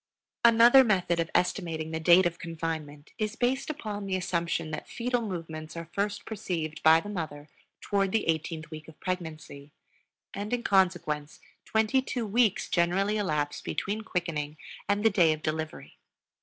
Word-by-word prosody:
Another 235 +3 +8
method 180 -6 +1
of 165 -1 0
estimating 165 -4 0
the 160 - -2
date 175 +3 +6
of 175 0 -1
confinement 160 -3 -5
is 215 0 -1
based 255 +4 0
upon 210 -9 -5
the 190 - 0
assumption 170 -3 -1
that - - -5
fetal 245 0 -1
movements 165 -6 -6
are 165 0 -7
first 205 0 -2
perceived 170 -7 -4
by 160 +1 +7
the 185 - -8
mother 155 -7 -5 0.3
toward 195 -2 0
the 225 - 0
eighteenth 160 0 -2
week 155 -1 -9
of 160 - -15
pregnancy; 160 -5 -5 0.6
and 205 +3 -4
in 245 -1 -1
consequence 175 -7 +1 0.3
twenty 220 +4 +2
two 250 -2 -3
weeks 215 -1 +2
generally 190 +5 +1
elapse 150 -7 -1
between 200 +8 -3
quickening 160 -7 -3 0.3
and 205 +1 +1
the 225 - +6
day 170 -6 +4
of 155 - -8
delivery. 155 0 -4
175 Hz, 155 wpm, -28 LUFS, 160-210 Hz, 0.6 s, Another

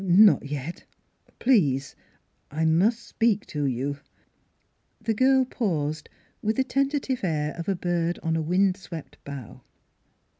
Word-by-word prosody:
" - - -6 0.3
Not 145 - -1
yet 145 +3 -5 0.5
please! 145 - +2 0.5
I 160 +3 -1
must 200 +9 +3
speak 225 -3 +1
to 145 -1 -3
you." 135 +2 -2 1.0
The 225 0 -1
girl 260 +3 +4
paused, 155 - -2 0.3
with 215 +1 0
the 265 - +2
tentative 275 -2 -1
air 155 -4 0
of 170 +2 -4
a 195 - +2
bird 175 -1 -1
on 165 -1 0
a 160 - 0
windswept 180 -4 -1
bough. 140 -5 -8
170 Hz, 135 wpm, -26 LUFS, 150-225 Hz, 1.0 s, girl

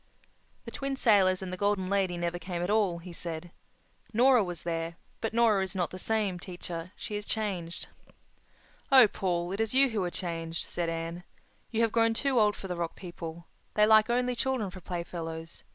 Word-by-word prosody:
"The - - -7
Twin 275 -1 -3
Sailors 195 -7 +4
and 185 -1 -5
the - - -4
Golden 200 -1 +1
Lady 190 -2 +1
never 175 0 -2
came 175 0 -4
at 180 - 0
all," 205 -5 +2
he 170 +1 -9
said. 170 0 -5 0.6
"Nora 245 +1 +5
was 175 -3 -5
there—but 165 +6 -4
Nora 225 -3 +4
is 190 +1 -4
not 180 -2 0
the 185 - -7
same, 205 -3 0
teacher. 175 -1 -6
She 230 -3 -6
is 205 - -2
changed." 190 -6 -3 1.0
"Oh, 260 -4 +9
Paul, 175 -3 -1
it 195 - -3
is 225 +2 0
you 270 0 +6
who 215 -5 -1
are 180 - -1
changed," 165 -2 -4
said 170 -1 -2
Anne. 165 +1 -4 0.5
"You 225 -1 0
have 230 -1 +3
grown 230 0 +3
too 270 0 +2
old 210 -1 +4
for 195 - -7
the 180 - -3
Rock 170 -1 -3
People. 170 -2 -8 0.3
They 210 - +6
like 215 +1 +6
only 250 +1 +1
children 250 -6 -1
for 185 - -10
playfellows. 165 -2 -6
185 Hz, 190 wpm, -29 LUFS, 170-220 Hz, 1.0 s, Oh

